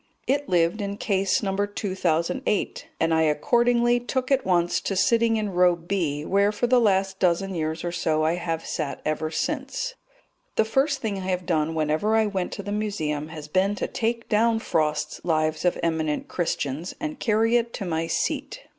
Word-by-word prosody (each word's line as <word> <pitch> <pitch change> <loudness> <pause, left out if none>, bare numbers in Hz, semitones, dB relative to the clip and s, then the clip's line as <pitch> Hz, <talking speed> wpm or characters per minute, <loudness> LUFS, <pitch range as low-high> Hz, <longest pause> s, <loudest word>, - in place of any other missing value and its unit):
It 285 +1 0
lived 175 +3 +2
in 200 0 -3
Case 195 +1 +1
No. 195 -1 -1
2008, 200 +1 -1
and 165 0 +2
I 160 - +3
accordingly 240 +10 +3
took 255 +2 -3
at 275 -1 +3
once 175 -2 +1
to 195 - -2
sitting 225 +3 +3
in 210 -2 -2
Row 180 0 +4
B, 165 -4 -2
where 200 +3 +3
for 215 +3 -1
the 245 0 +4
last 195 -3 +2
dozen 185 +2 +1
years 160 -1 -2
or 175 - -2
so 160 -3 0
I 160 +1 +2
have 165 -2 -3
sat 150 -4 -3
ever 155 +1 -1
since. - - -2 0.6
The 220 - +3
first 270 +4 +1
thing 210 -4 -2
I 185 - -5
have 180 -1 -1
done 160 -2 0
whenever 155 +8 +1
I 220 -1 +4
went 190 -3 -2
to 200 - -6
the 205 - -5
Museum 160 -9 -2
has 155 -2 -8
been 190 +6 +1
to - - -2
take 230 0 -2
down 225 +2 +3
Frost's 150 -7 -1
Lives 155 -1 0
of 180 - +2
Eminent 160 -2 -1
Christians 160 -2 -2
and 305 -2 -4
carry 225 +1 +2
it 235 -1 +1
to 200 - -4
my 165 -1 -1
seat. - - -2
190 Hz, 185 wpm, -25 LUFS, 160-220 Hz, 0.6 s, Row